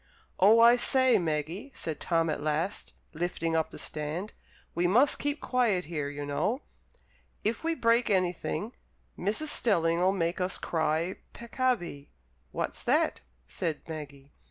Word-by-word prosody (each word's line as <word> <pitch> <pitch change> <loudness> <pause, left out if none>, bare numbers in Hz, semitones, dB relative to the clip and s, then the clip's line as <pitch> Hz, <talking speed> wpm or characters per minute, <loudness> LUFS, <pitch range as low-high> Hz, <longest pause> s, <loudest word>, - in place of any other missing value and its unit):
"Oh, 210 +5 +6
I 235 +1 +7
say, 260 0 +4
Maggie," 165 - -3
said 160 -3 -5
Tom 165 -2 +1
at - - -3
last, 155 +6 -2 0.2
lifting 165 0 -2
up 160 -1 +1
the - - -10
stand, 155 +7 -4 0.4
"we 175 +1 +1
must 245 +10 +4
keep 290 0 -1
quiet 230 -8 +1
here, 150 -3 -3
you 145 0 -6
know. 210 - -1 0.8
If 225 +7 -1
we 330 0 0
break 235 -2 +2
anything, 185 +3 -1 0.4
Mrs. 215 - -1
Stelling'll 175 - +2
make 175 -1 -1
us 180 +1 0
cry 160 +2 -1 0.2
peccavi." 235 - -2 0.4
"What's - - -3
that?" - - +1 0.3
said 165 - -4
Maggie. 145 -3 -8
180 Hz, 135 wpm, -29 LUFS, 160-230 Hz, 0.8 s, I